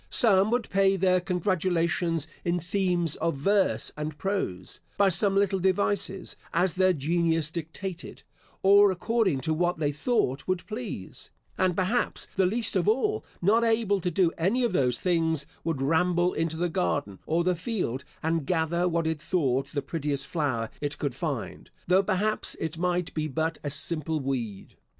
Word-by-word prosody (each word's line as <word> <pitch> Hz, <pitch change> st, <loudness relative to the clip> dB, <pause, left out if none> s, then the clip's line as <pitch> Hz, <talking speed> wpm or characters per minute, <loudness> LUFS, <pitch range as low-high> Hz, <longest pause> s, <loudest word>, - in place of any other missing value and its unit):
Some 200 Hz, -4 st, +5 dB
would 240 Hz, -1 st, 0 dB
pay 195 Hz, 0 st, +3 dB
their 185 Hz, -1 st, +2 dB
congratulations 175 Hz, -3 st, 0 dB, 0.2 s
in 175 Hz, 0 st, 0 dB
themes 175 Hz, -2 st, 0 dB
of 165 Hz, -1 st, -1 dB
verse 195 Hz, +8 st, +2 dB
and 150 Hz, 0 st, -5 dB
prose, 140 Hz, -, -3 dB, 0.2 s
by 200 Hz, -1 st, +4 dB
some 195 Hz, +3 st, +3 dB
little 195 Hz, -1 st, +2 dB
devices, 190 Hz, 0 st, 0 dB, 0.2 s
as 180 Hz, -2 st, +2 dB
their 185 Hz, +1 st, +3 dB
genius 165 Hz, 0 st, 0 dB
dictated, 170 Hz, +2 st, -6 dB, 0.4 s
or 200 Hz, +1 st, +7 dB
according 190 Hz, -, 0 dB
to 160 Hz, +2 st, 0 dB
what 175 Hz, +2 st, 0 dB
they 150 Hz, -2 st, 0 dB
thought 150 Hz, -, -1 dB
would 185 Hz, -2 st, -1 dB
please; 215 Hz, -, -7 dB, 0.3 s
and, 185 Hz, -2 st, +1 dB
perhaps, 190 Hz, +7 st, 0 dB
the 190 Hz, -1 st, +3 dB
least 225 Hz, +3 st, +1 dB
of 185 Hz, 0 st, +1 dB
all, 410 Hz, -, +1 dB, 0.2 s
not 220 Hz, +5 st, +4 dB
able 225 Hz, -3 st, +2 dB
to 180 Hz, -, -1 dB
do 175 Hz, 0 st, +2 dB
any 205 Hz, +10 st, +1 dB
of 235 Hz, -5 st, 0 dB
those 125 Hz, -7 st, +1 dB
things, 160 Hz, -4 st, +1 dB, 0.2 s
would 160 Hz, -5 st, -2 dB
ramble 175 Hz, +4 st, +2 dB
into 160 Hz, 0 st, -2 dB
the 175 Hz, +2 st, 0 dB
garden, 95 Hz, -, -2 dB
or 165 Hz, +2 st, +1 dB
the 180 Hz, 0 st, +1 dB
field, 170 Hz, -, -3 dB, 0.2 s
and 160 Hz, -2 st, -1 dB
gather 170 Hz, 0 st, +1 dB
what 170 Hz, -1 st, 0 dB
it 160 Hz, -2 st, -2 dB
thought 140 Hz, -6 st, 0 dB
the 140 Hz, -2 st, -3 dB
prettiest 145 Hz, -2 st, -2 dB
flower 130 Hz, -9 st, -2 dB
it 145 Hz, 0 st, -3 dB
could 140 Hz, -4 st, -2 dB
find, 135 Hz, -2 st, -5 dB, 0.2 s
though, 185 Hz, +2 st, +4 dB
perhaps, 210 Hz, +2 st, 0 dB
it 160 Hz, 0 st, -4 dB
might 180 Hz, 0 st, -1 dB
be 155 Hz, -1 st, -2 dB
but 160 Hz, +3 st, -2 dB
a 145 Hz, -, -2 dB
simple 155 Hz, +2 st, +1 dB
weed. 120 Hz, -8 st, -4 dB
175 Hz, 165 wpm, -27 LUFS, 155-190 Hz, 0.4 s, or